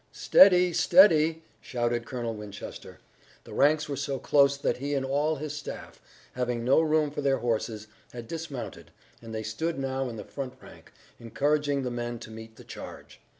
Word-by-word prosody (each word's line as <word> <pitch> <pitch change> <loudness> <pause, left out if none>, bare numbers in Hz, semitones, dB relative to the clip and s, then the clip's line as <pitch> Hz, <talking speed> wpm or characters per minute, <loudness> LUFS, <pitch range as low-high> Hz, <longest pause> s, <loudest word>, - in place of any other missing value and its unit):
"Steady! 180 -2 +6
Steady!" 165 -3 +5 0.2
shouted 120 -1 -2
Colonel 120 -3 -4
Winchester. 105 -2 -9 0.5
The - - -12
ranks 150 +2 +3
were 145 - -3
so 140 -1 -3
close 140 +1 +3
that 140 - -1
he 140 +3 -3
and 135 -1 -1
all 145 +4 +1
of 150 - -6
his 150 0 -5
staff, 150 - -8 0.3
having 125 -2 -2
no 135 +5 +5
room 155 -2 +1
for 145 - -4
their 135 -1 +2
horses, 110 -2 -2 0.3
had 120 -2 -9
dismounted, 155 -5 -7 0.3
and 115 -1 -10
they 110 0 -4
stood 160 +10 -3
now 135 -1 -2
in 115 - -7
the 105 - -7
front 135 -3 -6
rank, - - -16 0.3
encouraging 145 +4 0
the 125 - -3
men 120 0 -4
to 110 - -11
meet 110 0 -11
the - - -14
charge. - - -11
135 Hz, 180 wpm, -27 LUFS, 120-150 Hz, 0.5 s, Steady